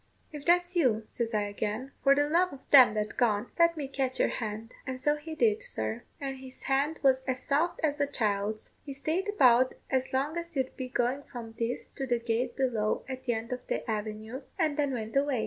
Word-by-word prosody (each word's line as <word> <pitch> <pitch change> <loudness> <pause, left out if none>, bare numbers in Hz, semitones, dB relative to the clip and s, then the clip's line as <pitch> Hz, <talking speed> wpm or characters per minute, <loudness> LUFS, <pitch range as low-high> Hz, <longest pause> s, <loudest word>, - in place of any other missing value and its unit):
'If 295 -2 -8
that's 355 +1 +3
you,' 235 -10 +2
says 235 -1 -2
I 210 - +2
again, 210 +5 -3
'for 275 0 +5
the 290 +1 +2
love 350 +4 +3
of 275 -1 -12
them 255 -6 +8
that 215 0 -2
gone, 220 -2 +1
let 335 -1 +5
me 285 -3 -3
catch 265 -1 -2
your - - +3
hand.' 220 0 -4 0.2
And 260 0 -3
so 295 +3 +2
he 315 +2 -7
did, 220 -7 +2
sir; 110 +1 -3 0.2
and 270 -1 -4
his 260 0 -10
hand 280 +4 +1
was 265 -1 +4
as 255 -1 -1
soft 315 +5 +1
as 295 -2 +1
a 285 - +2
child's. 215 -4 -1
He 280 - -6
stayed 320 +9 -1
about 255 - +5 0.2
as 260 -1 +1
long 280 +5 0
as 340 -1 -5
you'd 265 -1 -1
be 255 -1 -5
going 250 +2 0
from 230 -3 -7
this 235 +1 -2
to 270 - -5
the 240 -1 +2
gate 235 +1 -1
below 230 -6 0
at 260 -1 -6
the 240 - +2
end 225 +2 -3
of 250 - -7
the - - -2
avenue, 220 +3 -4 0.2
and 315 -5 +1
then 285 -2 +1
went 225 -2 -4
away. 275 -2 +2
260 Hz, 220 wpm, -29 LUFS, 225-285 Hz, 0.2 s, them